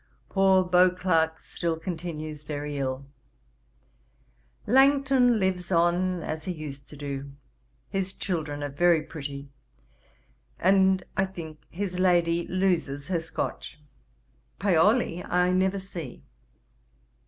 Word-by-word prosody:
'Poor 190 -1 +4
Beauclerk 180 -3 +3
still 165 -2 -3
continues 155 -3 -5
very 145 0 -4
ill. 130 0 -3 1.6
Langton 265 -2 +4
lives 185 -2 -1
on 175 +1 +2
as 155 0 -5
he 185 - -2
used 145 -4 -8
to 150 - -11
do. 140 -1 -5 0.5
His 195 -1 -2
children 155 -7 -3
are 145 - -2
very 165 +2 +3
pretty, 140 -2 -7 1.1
and, 190 0 +4
I 190 - +2
think, 160 -5 -9
his 185 0 -4
lady 170 -2 +2
loses 175 -6 0
her 175 -3 +1
Scotch. 165 -2 -5 0.8
Paoli 195 0 +2
I 180 0 +2
never 190 +1 +2
see. 175 -9 -8
175 Hz, 110 wpm, -27 LUFS, 155-190 Hz, 1.6 s, Poor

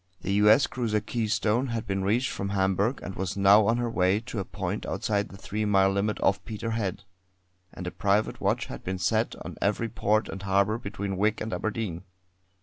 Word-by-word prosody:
The 95 - -1
U. 105 +1 +5
S. 110 +6 +6
cruiser 115 -4 -1
Keystone 110 +2 0
had 115 -2 -3
been 95 0 -1
reached 115 +6 +1
from 100 - -3
Hamburgh, 100 +5 +1
and 95 - -5
was 95 +1 -3
now 100 +1 +6
on 115 - +3
her 120 0 0
way 95 -3 +2
to 115 -2 -5
a - - -1
point 100 0 -4
outside 105 -1 -1
the 95 - -11
three 105 +2 -3
mile 95 -2 +4
limit 100 +1 -1
off 100 - +2
Peterhead; 110 -3 -3 0.7
and 90 - -8
a 90 - -3
private 100 +2 0
watch - - +1
had - - -8
been 95 0 -3
set 110 +6 0
on - - -7
every 105 +3 0
port 110 -1 +1
and 95 - -6
harbour 100 +3 +1
between 100 -3 -4
Wick 105 +3 +1
and 110 -1 -4
Aberdeen. 100 -2 -3
105 Hz, 200 wpm, -27 LUFS, 95-110 Hz, 0.7 s, S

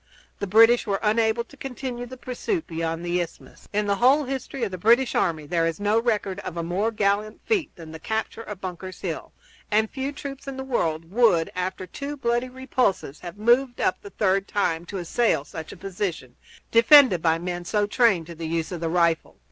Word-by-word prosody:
The 200 - -3
British 225 +5 +6
were 195 -1 0
unable 220 +2 +2
to 260 - -17
continue 250 -2 -5
the 260 +1 -10
pursuit 310 - -3
beyond 165 0 -3
the 175 +1 +1
isthmus. 170 - -9
In 210 +1 0
the 200 -1 +1
whole 270 +6 +5
history 270 -1 -4
of 210 - -1
the 185 - -4
British 235 +6 +4
army 155 -3 0
there 165 +2 +1
is 165 -1 -3
no 205 +2 +2
record 210 -5 -1
of 175 -4 -6
a 170 - -1
more 185 +6 0
gallant 210 0 0
feat 410 -8 0
than 165 -2 -10
the 160 - -8
capture 220 +5 -3
of 210 -4 -8
Bunker's 185 0 -7
Hill, - - -4 0.4
and 220 +1 +2
few 270 +1 -3
troops 280 -1 -8
in 270 -1 -5
the 265 - -4
world 165 -10 -1
would, 210 -7 +3
after 185 +1 -3
two 285 +8 -6
bloody 240 0 0
repulses, 250 - -1
have 175 +2 -9
moved 240 +3 +2
up 185 - 0
the 200 - -10
third 195 -1 +1
time 170 -5 0
to 200 - -5
assail 175 -3 +1
such 160 0 -8
a - - -10
position, 175 -9 -4 0.4
defended 230 - +7
by 160 -1 +3
men 175 +1 -4
so 205 +4 +1
trained 205 -6 +3
to 170 - -9
the 165 0 -6
use 165 +1 -2
of 175 -2 -5
the 165 - -1
rifle. 170 -1 +1
205 Hz, 205 wpm, -25 LUFS, 175-240 Hz, 0.4 s, defended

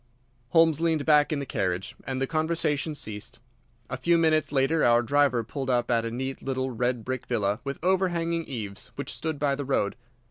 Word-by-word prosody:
Holmes 165 +1 +4
leaned 160 -3 +1
back 150 -1 +5
in 155 - 0
the 140 - -3
carriage, 95 -2 -2
and 130 -1 -3
the 135 - +1
conversation 155 0 0
ceased. 115 0 -4 0.5
A 130 - -4
few 170 +6 +3
minutes 160 -2 +2
later 145 +3 +2
our 120 0 +5
driver 140 -2 +2
pulled 135 +4 -5
up 120 -1 +1
at 115 -1 +2
a - - -1
neat 130 +3 -4
little 130 -1 -2
red 120 -1 -1
brick 130 -1 -4
villa 105 -4 0
with 140 0 -4
overhanging 170 -3 +1
eaves 105 -6 -5
which - - -5
stood 160 -1 -3
by 140 -1 +1
the 140 +1 -3
road. 130 -7 0
135 Hz, 190 wpm, -27 LUFS, 120-155 Hz, 0.5 s, back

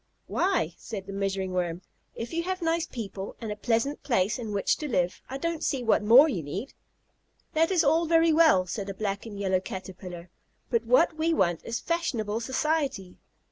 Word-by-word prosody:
"Why," 360 - 0
said 200 -4 -6
the 195 - -7
Measuring 195 -1 -2
Worm, 175 -1 -2 0.3
"if 230 +7 -6
you 335 - 0
have 370 0 -3
nice 330 0 +1
people 200 -4 -6
and 225 -3 -5
a - - -3
pleasant 230 +6 0
place 220 -2 +1
in 225 -3 -5
which 200 -1 +1
to 300 - -4
live, 180 -8 0
I 265 - -4
don't 335 +2 -2
see 265 -3 0
what 225 -2 +3
more 240 +8 +8
you 200 - -2
need." 190 - -6 0.8
"That 325 +1 +3
is 360 -3 +3
all 320 +3 +3
very 330 0 +4
well," 310 - +5
said 200 +2 -4
a 195 - -5
black 200 +1 -3
and 205 -2 -8
yellow 190 -2 +1
Caterpillar, 185 -2 -8 0.4
"but 465 - +1
what 345 -10 +3
we 325 +1 +2
want 175 - +1
is 230 0 -3
fashionable 235 -11 -1
society. 260 - -1
225 Hz, 190 wpm, -27 LUFS, 190-315 Hz, 0.8 s, more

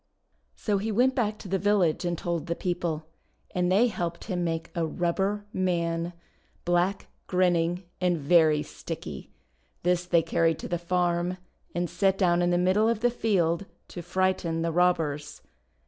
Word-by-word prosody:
So 205 -3 0
he 220 +3 -2
went 250 +5 +3
back 215 -5 0
to - - -10
the 190 +1 0
village 190 -4 +2
and 175 -1 -1
told 170 -1 -3
the 170 - -1
people, 170 -4 -2 0.5
and 180 0 +1
they 205 +6 +5
helped 170 -7 -3
him 180 -4 -2
make 165 -1 -2
a 170 - -1
Rubber 190 +5 -1
Man, 170 -2 -1 0.5
black, 175 +3 +1 0.2
grinning, 175 -1 +1 0.2
and 180 -1 +2
very 155 0 +4
sticky. - - -7 0.5
This 180 0 +1
they 170 -2 +3
carried 165 0 +2
to - - -6
the 175 -1 -2
farm, 175 0 0 0.4
and 175 0 0
set 190 +3 +1
down 175 -2 +3
in 175 - +2
the 175 - +2
middle 190 +5 +3
of 230 -2 -1
the 245 0 +3
field 195 -6 +1 0.2
to 175 - -7
frighten 175 -2 0
the 165 - 0
robbers. 160 -4 0
175 Hz, 165 wpm, -27 LUFS, 170-190 Hz, 0.5 s, they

